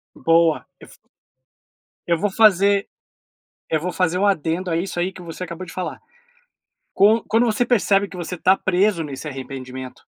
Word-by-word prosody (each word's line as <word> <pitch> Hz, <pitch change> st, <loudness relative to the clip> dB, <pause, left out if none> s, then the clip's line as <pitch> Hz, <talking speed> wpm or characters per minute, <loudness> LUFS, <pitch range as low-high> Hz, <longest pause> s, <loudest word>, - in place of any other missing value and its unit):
Boa! 165 Hz, -1 st, +2 dB, 0.2 s
Eu -, -, -13 dB
f -, -, -17 dB, 1.1 s
eu 170 Hz, -1 st, +2 dB
vou 205 Hz, +2 st, 0 dB
fazer 200 Hz, -1 st, +4 dB, 0.8 s
eu 155 Hz, -, +1 dB
vou 180 Hz, +2 st, -3 dB
fazer 180 Hz, -1 st, 0 dB
um 205 Hz, -, +2 dB
adendo 175 Hz, -1 st, 0 dB
a 165 Hz, -, 0 dB
isso 175 Hz, 0 st, -3 dB
aí 180 Hz, +2 st, 0 dB
que 185 Hz, -1 st, -12 dB
você 170 Hz, +1 st, -8 dB
acabou 180 Hz, +1 st, -6 dB
de -, -, -10 dB
falar. 185 Hz, -1 st, -5 dB, 1.0 s
Con 210 Hz, +3 st, +4 dB
Quando 230 Hz, +2 st, +3 dB
você 230 Hz, +2 st, +1 dB
percebe 200 Hz, -4 st, +2 dB
que 185 Hz, -, -11 dB
você 175 Hz, +1 st, -5 dB
tá 190 Hz, +3 st, +4 dB
preso 185 Hz, -1 st, +1 dB
nesse 145 Hz, +1 st, -7 dB
arrependimento? 130 Hz, -2 st, -7 dB
180 Hz, 175 wpm, -21 LUFS, 165-200 Hz, 1.1 s, fazer